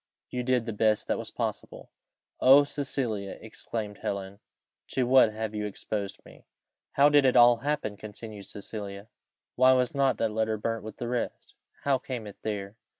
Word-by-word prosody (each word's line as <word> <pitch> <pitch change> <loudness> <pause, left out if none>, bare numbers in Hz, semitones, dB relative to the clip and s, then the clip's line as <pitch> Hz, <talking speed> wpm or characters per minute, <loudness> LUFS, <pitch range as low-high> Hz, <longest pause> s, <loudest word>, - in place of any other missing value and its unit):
you 125 - -2
did 125 -1 +1
the 115 - -3
best 110 0 +2
that - - -1
was - - -6
possible!" - - -5 0.5
"O 135 +3 +8
Cecilia!" 130 -8 -3
exclaimed 110 -1 -6
Helen, 100 0 -4 0.5
"to 130 - 0
what 125 -3 +6
have 110 0 -4
you 105 0 -2
exposed 100 0 -5
me?" - - -17 0.5
"How 140 +1 +6
did 145 -1 +5
it 130 -1 +3
all 120 0 +7
happen?" 125 -6 -2
continued 105 -1 -9
Cecilia. 100 0 -7 0.5
"Why 130 +1 +6
was 125 -1 +1
not 135 -4 +2
that 110 - 0
letter 110 0 0
burnt 115 +1 -3
with 110 - -8
the 120 - -4
rest? 120 0 -3 0.3
How 140 -2 +2
came 125 -4 -5
it 105 - -10
there? 105 -1 -4
110 Hz, 170 wpm, -28 LUFS, 105-130 Hz, 0.5 s, O